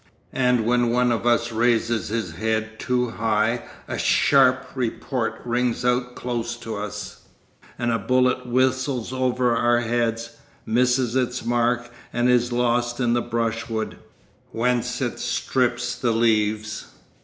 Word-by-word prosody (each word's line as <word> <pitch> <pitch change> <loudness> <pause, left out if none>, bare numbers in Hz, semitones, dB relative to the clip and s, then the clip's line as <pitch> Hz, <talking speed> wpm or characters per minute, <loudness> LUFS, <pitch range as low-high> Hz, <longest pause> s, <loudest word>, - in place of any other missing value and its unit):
And 125 -3 +2
when 120 0 +2
one 125 +1 +2
of 115 +1 -1
us 120 0 +2
raises 115 -1 +1
his 110 -5 -2
head 110 +4 -2
too 125 -1 0
high 110 +1 0 0.3
a - - -4
sharp 130 -2 +4
report 120 -2 -2
rings 120 0 0
out 125 0 0
close 120 -1 -3
to 115 -2 -6
us, 105 +1 -7 0.5
and 120 0 0
a 115 - 0
bullet 125 +3 +1
whistles 130 0 0
over 125 -2 +1
our 120 0 +3
heads, 115 -1 -1 0.3
misses 125 +1 +2
its 125 -2 -1
mark, 120 0 0 0.2
and 120 +1 +1
is 125 0 +3
lost 120 0 0
in 120 -2 +2
the 120 - +2
brushwood, 115 -1 -2 0.5
whence 125 +1 0
it 120 -2 -2
strips 120 -1 0
the 120 - -1
leaves. 110 -2 0
120 Hz, 135 wpm, -23 LUFS, 115-125 Hz, 0.5 s, sharp